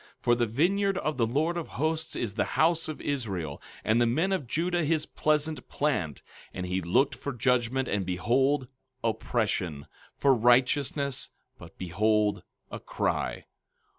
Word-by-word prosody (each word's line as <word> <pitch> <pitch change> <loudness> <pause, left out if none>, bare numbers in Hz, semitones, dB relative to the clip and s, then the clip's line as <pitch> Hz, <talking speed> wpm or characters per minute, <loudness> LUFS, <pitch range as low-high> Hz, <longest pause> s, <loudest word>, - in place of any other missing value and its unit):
15:7 - - -36
For 120 - +4
the 120 -1 +1
vineyard 190 - +1
of 155 -5 -2
the 115 -3 +2
Lord 155 +8 0
of 170 - -4
Hosts 160 +1 -1
is 110 -4 -2
the 105 -1 +1
house 165 +1 +3
of 155 - -5
Israel, 95 - -3 0.2
and 115 +2 +3
the 120 - +4
men 160 +11 +1
of 175 -10 -1
Judah 175 +5 0
his 155 0 +1
pleasant 155 -2 0
plant; 125 - -1 0.3
and 90 - -3
he 90 +1 -1
looked 125 - +2
for 130 +3 -5
judgment, 125 +1 +1
and 100 -1 0
behold, 125 +9 +1 0.4
oppression; 105 -9 -1 0.3
for 140 -1 +4
righteousness, 130 +3 +2 0.3
but - - -13
behold, 105 +4 +1 0.3
a - - -5
cry. - - -2
130 Hz, 155 wpm, -28 LUFS, 110-155 Hz, 0.4 s, For